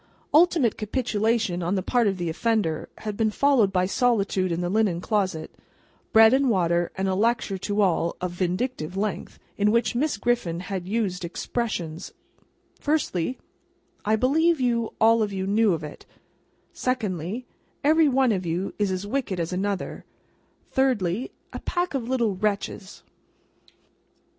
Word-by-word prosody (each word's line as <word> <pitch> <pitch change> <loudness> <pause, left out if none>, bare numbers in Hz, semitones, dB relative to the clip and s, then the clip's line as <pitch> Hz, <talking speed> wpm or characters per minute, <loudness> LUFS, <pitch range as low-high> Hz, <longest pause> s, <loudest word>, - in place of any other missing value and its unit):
Ultimate 310 - +4
capitulation 220 -4 0
on 175 +3 0
the 190 - -1
part 240 +2 +2
of 195 -2 0
the 175 -1 -3
offender, 165 -2 0 0.2
had 210 -1 -2
been 220 +1 +1
followed 240 -3 +3
by 185 -1 +2
solitude 200 -4 +1
in 170 - -1
the 175 - -1
linen 195 -3 +1
closet, 185 -5 -1 0.6
bread 220 +1 +7
and 270 0 +3
water 175 -4 +1
and 190 0 0
a 190 - +1
lecture 215 -1 0
to 205 +2 -1
all, 170 -2 +1
of 180 -1 -3
vindictive 180 0 -2
length, 205 0 -3 0.2
in 205 +1 +3
which 235 +2 +2
Miss 275 -1 0
Griffin 205 -7 0
had 185 -1 -5
used 195 -4 -1
expressions: 170 -3 -4 0.7
Firstly, 260 - -1 0.7
"I 215 +1 +2
believe 315 +7 +2
you 235 -3 0
all 225 +1 +5
of 210 -1 0
you 190 -1 -3
knew 210 +2 +3
of 165 -3 -2
it;" 150 - -9 0.7
Secondly, 215 -3 -2 0.4
"Every 310 +2 +5
one 260 -2 +3
of 190 -3 -1
you 175 +3 -2
is 205 -1 +2
as 185 +1 -3
wicked 210 -5 -2
as 170 +1 -2
another;" 195 +1 -3 0.7
Thirdly, 240 -5 +1 0.2
"A - - -5
pack 355 -1 -2
of 250 -3 -3
little 235 -6 +1
wretches." 200 0 -3
205 Hz, 150 wpm, -25 LUFS, 185-240 Hz, 0.7 s, bread